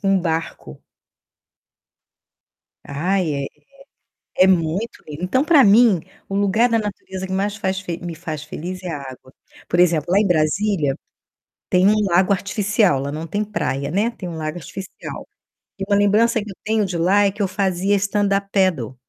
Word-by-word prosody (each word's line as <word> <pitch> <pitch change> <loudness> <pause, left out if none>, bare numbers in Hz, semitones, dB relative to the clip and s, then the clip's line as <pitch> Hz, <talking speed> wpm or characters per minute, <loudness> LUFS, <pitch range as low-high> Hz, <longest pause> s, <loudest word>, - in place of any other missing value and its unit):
com 195 - -1
um 195 -2 +3
barco. 160 - -4 2.0
Ai, 175 +3 -1
é 140 0 -2
é - - -5 0.9
é 185 - +7
muito 185 +4 0
lindo. 150 +2 -8
Então 260 +9 +1
pra 305 -5 +5
mim, 210 -2 +5 0.3
o 195 - -5
lugar 205 +4 +2
da 230 -1 +2
natureza 190 -2 -5
que 190 - -7
mais 200 +2 -1
faz 190 -3 -2
fe 175 -4 -5
me 170 -1 -5
faz 155 -2 -6
feliz 180 +4 -7
é 180 - -5
a 150 - -4
água. 130 -1 -11 0.3
Por 175 - +1
exemplo, 170 -3 +3
lá 195 - +5
em 210 - +3
Brasília, 160 -2 +1 0.7
tem 185 0 +3
um 215 - +4
lago 185 +2 +3
artificial, 200 - +1
lá 140 +2 -4
não 155 +2 -5
tem 205 +6 -2
praia, 140 -9 -3
né, 205 +8 +1
tem 190 -6 -8
um 165 - -6
lago 155 +1 -4
artificial. 185 +5 -8 0.5
E 195 - -2
uma 200 - +2
lembrança 215 +3 +3
que 210 - -10
eu 190 - -11
tenho 220 -1 +1
de 180 -3 -3
lá 195 +4 +4
é 200 - +2
que 205 +2 -7
eu 195 - +2
fazia 190 0 0
stand 205 +1 0
up 200 0 -5
paddle. 170 - +1
190 Hz, 185 wpm, -21 LUFS, 165-205 Hz, 2.0 s, é